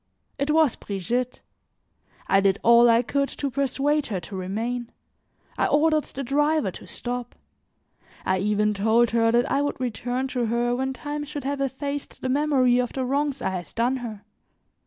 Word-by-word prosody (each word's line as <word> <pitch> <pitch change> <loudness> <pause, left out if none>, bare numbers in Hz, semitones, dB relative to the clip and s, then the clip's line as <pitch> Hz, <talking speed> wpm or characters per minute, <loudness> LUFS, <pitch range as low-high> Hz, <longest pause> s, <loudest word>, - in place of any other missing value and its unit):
It 280 +2 -1
was 310 -4 +4
Brigitte. 235 +6 -3 0.8
I 195 - +4
did 195 0 +3
all 235 +1 +7
I 230 +1 +4
could 280 +3 0
to 280 -2 -4
persuade 280 +2 0
her 200 -4 -2
to 190 +4 -9
remain; 225 +6 -3 0.7
I - - +3
ordered 305 +1 +3
the 275 - -6
driver 295 -3 +1
to - - -12
stop; 245 0 -5 0.9
I 185 0 +1
even 210 +1 +1
told 220 +4 +3
her 230 -1 +3
that 240 +4 +2
I 275 - +2
would 285 -1 -2
return 250 +2 -2
to 245 -2 -1
her 240 +2 +1
when 265 +1 -1
time 295 +2 -5
should 295 0 -6
have 280 +1 -2
effaced 280 +1 -4
the 260 - -1
memory 260 -3 +3
of 250 -1 -1
the 260 -1 -2
wrongs 280 0 -1
I 190 - 0
had 180 -2 -6
done 245 +3 +1
her. 220 -5 -7
250 Hz, 175 wpm, -25 LUFS, 230-280 Hz, 0.9 s, all